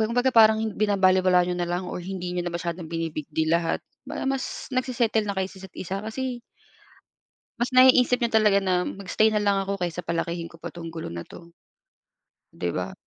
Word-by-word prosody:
ba 220 - +2
kumbaga, 245 +2 +1
parang 220 -1 +5
binabalewala 185 -3 +3
niyo 180 - -1
na 175 -1 -2
lang 175 +1 -2
or 180 - -5
hindi 180 -1 -5
niyo 175 - -1
na 175 - -3
masyadong 170 -1 -4
bini-big 165 -3 -4
deal 160 +1 0
lahat, 170 -1 +1 0.3
parang - - -4
mas 265 - -5
nagse-settle 240 -4 +1
na 200 - -2
kayo 190 -1 0
sa 190 - -13
isa't-isa. 190 0 -6
Kasi 245 +3 -4 1.2
mas 245 +1 -1
naiisip 255 -1 +6
niyo 235 - 0
talaga 210 -3 +4
na 180 -1 +1
mag-stay 200 +2 +1
na 210 - +1
lang 200 -1 +2
ako 195 -1 -2
kaysa 175 0 -3
palakihin 170 0 -3
ko 165 - -15
pa 165 - -8
'tong 170 -1 -8
gulo 160 - -5
na 85 0 -7
'to. 170 0 -13 1.0
'Di - - -3
ba? - - -3
190 Hz, 195 wpm, -25 LUFS, 175-220 Hz, 1.2 s, naiisip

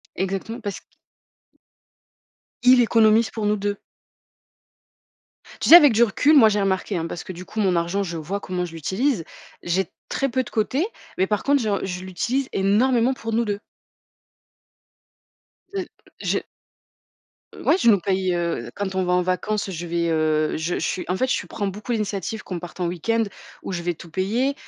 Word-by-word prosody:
Exactement 195 +5 -3
parce 205 -2 -4
q - - -39 1.8
Il 250 0 +7
économise 225 -1 +4
pour 220 -2 -3
nous 210 0 +2
2. 205 0 -3 1.8
Tu - - +1
sais 330 - +12
avec 295 -6 +9
du 230 +2 +5
recul, 285 +7 +4
moi, 230 -5 +8
j'ai 210 -1 +1
remarqué 195 +1 0
hein, 165 -2 -1
parce 165 0 -6
que 185 - -6
du 180 +1 -9
coup 220 - -7
mon 190 -4 +2
argent 170 +4 0
je 175 -4 -4
vois 175 +6 -4
comment 180 -2 -3
je 175 - -5
l'utilise. 190 - -1 0.4
J'ai 175 +1 -1 0.2
très 275 - -1
peu 260 +1 0
de - - -11
côté 260 - 0 0.3
mais 190 - +3
par 210 0 -1
contre 285 -1 +3
j'en 210 -3 0
je 180 -1 -4
l'utilise 240 +9 -1
énormément 230 +6 +3
pour 225 -3 -5
nous 230 +2 +2
2. 205 -1 -2 2.1
Heu, 385 -2 -2 0.3
je - - -1 1.1
Ouais 340 - +2
je 235 - +4
nous 205 -3 +5
paye, 185 0 0
heu, 170 -9 -2
quand 200 -1 -3
on 190 0 0
va 180 - +1
en 180 0 +3
vacances 195 +3 -1
je 175 -1 -5
vais, 170 0 0
heu, 155 -1 +1
je 165 +3 -2
je - - -1
suis 185 - -2
en 180 - -1
fait, 260 - +2
je - - -3
prends 205 - -4
beaucoup 205 +5 -5
l'initiative 210 -1 -3
qu'on 180 -2 -5
parte 175 +1 -10
en 180 - 0
week-end 180 +7 0 0.4
où - - -5
je 175 -2 -3
vais 175 0 -2
tout 165 +1 -13
payer, 225 - 0
195 Hz, 185 wpm, -23 LUFS, 180-225 Hz, 2.1 s, sais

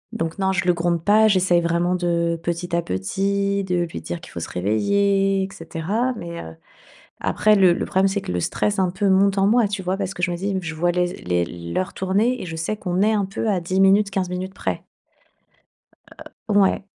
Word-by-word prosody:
Donc 165 +3 -3
non, 190 -1 +1
je 190 -1 0
le 180 - +4
gronde 170 -1 -1
pas. 215 +2 +5
J'essaye 185 -3 +3
vraiment 170 +1 0
de 170 -1 0
petit 170 0 -3
à 170 - +1
petit, 195 - -1
de 180 -2 -1
lui 120 - -7
dire 85 +1 -6
qu'il - - -13
faut - - -6
se - - -5
réveiller 195 - +1
et 190 - -5
cetera 190 +10 -2
mais, 170 -3 -6
heu, 80 0 -10 0.6
après, 215 0 +3
le 190 -4 +5
le - - -2
problème, 190 +1 +2
c'est 195 +1 -2
que - - -5
le 90 - -1
stress, 205 - -1
un 185 -2 +2
peu, 195 +3 0
monte 195 +1 +3
en 195 0 +3
moi, 225 +1 +3
tu 195 -1 -4
vois? 185 +1 -1
Parce 195 -1 -3
que 175 - -7
je 175 - +1
me 175 - -2
dis 195 +2 -2
je 160 -2 -5
vois 175 +3 +1
les 180 0 +1 0.2
les 90 -1 +1
l'heure 85 - -4
tourner 210 +7 0
et - - -5
je 165 -1 -6
sais 165 +7 -2
qu'on 180 -1 -1
est 215 +1 +3
un 205 -3 +1
peu 195 +3 -3
à 190 -3 +1
10 185 +2 -2
minutes, 200 +1 +4
15 190 -2 -2
minutes 185 +1 -4
près. - - -3 1.6
Heu, 210 -2 +2
ouais. 195 -1 +3
185 Hz, 225 wpm, -22 LUFS, 170-200 Hz, 1.6 s, pas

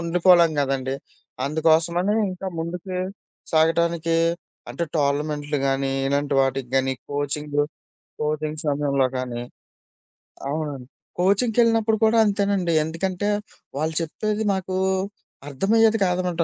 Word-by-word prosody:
ఉండిపోలేం 170 0 +4
కదండీ 135 -1 -1 0.5
అందుకోసమని 165 +6 +2 0.2
ఇంకా 185 +1 -6
ముందుకు 180 +3 -4 0.6
సాగటానికి 165 +1 +2 0.5
అంటే 170 - -2
టోర్నమెంట్లు 145 +1 0
గానీ, 135 0 0 0.2
ఇలాంటి 140 +1 0
వాటికి 135 -1 0
గాని 135 0 +2 0.2
కోచింగు 145 +1 -1 0.6
కోచింగ్స్ 155 +1 -2
సమయంలో 140 -2 +1
గానీ. 125 -2 -4 1.1
అవునండి. 145 -4 -4 0.3
కోచింగ్‌కెళ్ళినప్పుడు 225 +3 +3
కూడా 220 +1 +3
అంతేనండి. 200 -4 +1
ఎందుకంటే 185 +5 -2 0.5
వాళ్ళు 160 +2 -1
చెప్పేది 215 +6 -2
మాకు 190 -1 -3 0.7
అర్థమయ్యేది 225 +9 +3
కాదనమాట. 180 -2 0
160 Hz, 95 wpm, -23 LUFS, 145-185 Hz, 1.1 s, ఉండిపోలేం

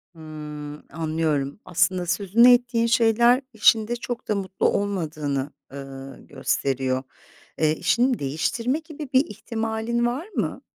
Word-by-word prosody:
Hımm. 150 -2 -8
Anlıyorum. 155 -2 -1
Aslında 180 +1 +1
sözünü 205 +7 +5
ettiğin 240 -1 +2
şeyler 235 +2 +4
işinde 220 +1 +4
çok 240 0 -6
da 210 - +1
mutlu 190 -1 -1
olmadığını, 155 -8 -2 0.2
ııı, 135 -1 -8
gösteriyor. 130 -1 -1 0.6
Eee, 155 -1 +3
işini 245 +8 +2
değiştirme 160 - -1
gibi 310 -3 -9
bir 260 +3 +5
ihtimalin 225 -3 -2
var 255 +9 -2
mı? - - -3
195 Hz, 115 wpm, -24 LUFS, 150-235 Hz, 0.6 s, sözünü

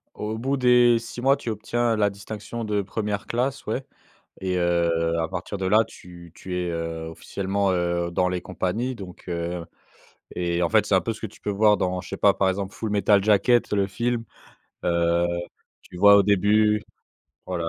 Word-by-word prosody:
Au 110 +1 -4
bout 135 +4 -1
des 125 -2 +5
6 115 +1 -8
mois, 135 +2 +4
tu 130 - -5
obtiens 115 +2 0
la 105 -1 +2
distinction 105 +3 -7
de 105 -2 0
1re 105 0 -3
classe, 130 +3 -2
ouais, 125 +5 -3 0.6
et 95 -1 -1
heu, 85 -1 +1
à 80 - 0
partir 95 +3 -5
de 95 - -3
là, 105 +4 +5
tu 85 -1 -13
tu 90 -1 -6
es, 90 -1 -2
heu, 85 -1 -4
officiellement, 95 +4 -2
heu, 85 -1 0
dans 90 +1 +1
les 90 -1 -2
compagnies, 110 +8 -2
donc 95 -4 -10
heu 85 0 -3 0.7
Et 85 0 0
en 85 - +1
fait 110 -2 +3
c'est 100 - +2
un 95 - +4
peu 115 - -2
ce 110 - -13
que 110 - -3
tu 100 - -18
peux - - -3
voir 105 +1 +4
dans 90 0 -1
je - - -12
sais - - -5
pas, - - +4
par 95 - +1
exemple 95 +1 -3
Full 110 - -4
Metal 100 0 +3
Jacket, 110 +3 +3
le 100 -1 +2
film, 120 +4 -2 0.6
heu, 85 0 +2 0.6
tu - - -13
vois 100 +2 +7
au 100 - +6
début? 105 +2 +3 0.6
Voilà. 85 -3 -2
100 Hz, 195 wpm, -24 LUFS, 90-110 Hz, 0.7 s, vois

